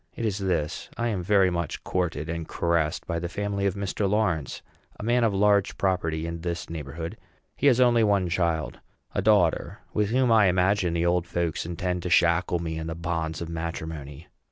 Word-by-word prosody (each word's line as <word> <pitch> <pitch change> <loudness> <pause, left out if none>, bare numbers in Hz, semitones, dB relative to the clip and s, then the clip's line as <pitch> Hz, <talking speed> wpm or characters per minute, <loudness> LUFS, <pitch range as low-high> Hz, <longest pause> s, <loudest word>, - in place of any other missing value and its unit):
It 115 - -3
is 105 -2 -1
this: 90 -5 -2
I 120 0 0
am 100 -5 -1
very 95 0 +3
much 85 -3 -3
courted 85 -4 -2
and 85 -1 -4
caressed 85 -2 0
by 85 -2 -2
the 85 0 -4
family 100 +1 -1
of 95 - -1
Mr. 100 0 -1
Lawrence, 90 - 0 0.4
a - - -6
man 120 +2 +2
of 115 - +3
large 100 0 +2
property 85 -4 0
in 85 0 -5
this 85 -1 -4
neighborhood. 80 +1 -6 0.4
He 145 - +2
has 130 -3 +5
only 120 -2 +5
one 100 -3 +2
child 85 -3 -1 0.3
a - - 0
daughter, 100 -5 +2
with 105 -1 +1
whom 125 +1 +2
I 110 -3 +6
imagine 90 0 +2
the 85 0 +1
old 85 0 +1
folks 85 -2 -2
intend 90 +1 -2
to 90 - -3
shackle 85 +1 +3
me 80 -1 -4
in 80 - -5
the 80 - -4
bonds 80 -1 -3
of 85 - -4
matrimony. 80 -3 -5
90 Hz, 195 wpm, -26 LUFS, 85-100 Hz, 0.4 s, I